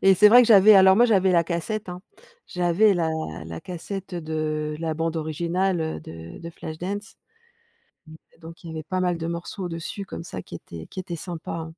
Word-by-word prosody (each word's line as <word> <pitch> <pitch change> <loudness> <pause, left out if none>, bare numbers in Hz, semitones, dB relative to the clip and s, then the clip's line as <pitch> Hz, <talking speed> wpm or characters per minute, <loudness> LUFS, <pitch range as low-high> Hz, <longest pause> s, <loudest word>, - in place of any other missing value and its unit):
et 195 0 +6
c'est 210 +3 +7
vrai 245 +3 +8
que - - +2
j'avais 210 0 +8
alors 190 0 +7
moi 240 +1 +6
j'avais 190 -4 +3
la 170 -1 +4
cassette, 185 +5 -3
hein, 180 0 -6 0.5
j'avais 180 +4 +3
la 165 -2 0 0.4
la 80 0 -7
cassette, 190 +2 -7
heu, 170 - -3
de 155 -1 -3
la 160 -1 -2
bande 165 +1 -2
originale, 170 +3 -1
heu, 160 - -3
de 80 +1 -10
de 170 0 -8
Flashdance. 185 +7 -6 0.9
Mmh - - -11 0.2
et - - -26
donc, 165 +1 -12
il 170 - -8
y - - -6
avait 160 -1 -6
pas 185 +3 -2
mal 180 -2 0
de 165 - -4
morceaux 170 +3 -5
au-dessus 175 +3 -5
comme - - -7
ça 95 - -6
qui - - -12
étaient 80 -1 -9
qui - - -12
étaient 175 -2 -6
sympa, 170 0 -7
hein. 165 -1 -4
170 Hz, 220 wpm, -24 LUFS, 160-190 Hz, 0.9 s, vrai